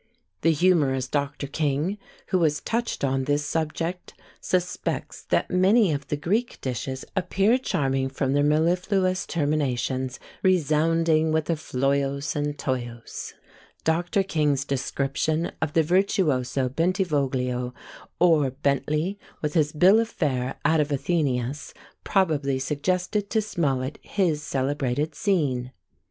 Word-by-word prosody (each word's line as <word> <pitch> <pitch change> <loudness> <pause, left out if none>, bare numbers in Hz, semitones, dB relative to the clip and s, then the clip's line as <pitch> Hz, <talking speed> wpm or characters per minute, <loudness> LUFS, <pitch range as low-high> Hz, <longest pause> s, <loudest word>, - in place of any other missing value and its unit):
The 165 - +3
humorous 150 -6 +2
Dr. 140 +1 -2
King, 150 +7 -1 0.3
who 185 - +2
has 150 -3 +2
touched 230 +3 -2
on 135 -1 +1
this 145 +1 0
subject, 165 +3 -3 0.2
suspects 180 -1 -2
that - - +1
many 190 +2 +4
of 140 -1 -4
the 150 - -1
Greek 210 +11 -1
dishes 130 +1 -4
appear 195 +6 +2
charming 135 - 0
from 135 0 -1
their 145 - +3
mellifluous 180 +5 +1
terminations, 135 -4 -1 0.2
resounding 160 -2 +2
with 160 +1 +1
a - - +2
floios 140 0 -1
and 145 0 -2
toios. 120 -4 -4 0.5
Dr. 175 +5 +1
King's 150 -6 0
description 140 +4 -1
of 155 -2 -1
the 165 - +4
Virtuoso 150 -7 +1
Bentivoglio 135 -6 0 0.4
or 160 -6 +4
Bentley, 150 +7 -1 0.2
with 150 - -1
his 150 -3 +2
"Bill 185 +8 +5
of 225 0 0
Fare" 130 - -1
out 160 0 +4
of 150 - +2
AthenÃḊus, 140 -3 -1 0.3
probably 150 -8 +1
suggested 180 +9 -1
to 220 - +2
Smollett 145 -10 -1
his 170 -7 0
celebrated 140 +1 -1
scene. 140 -11 0
150 Hz, 120 wpm, -25 LUFS, 135-175 Hz, 0.5 s, Bill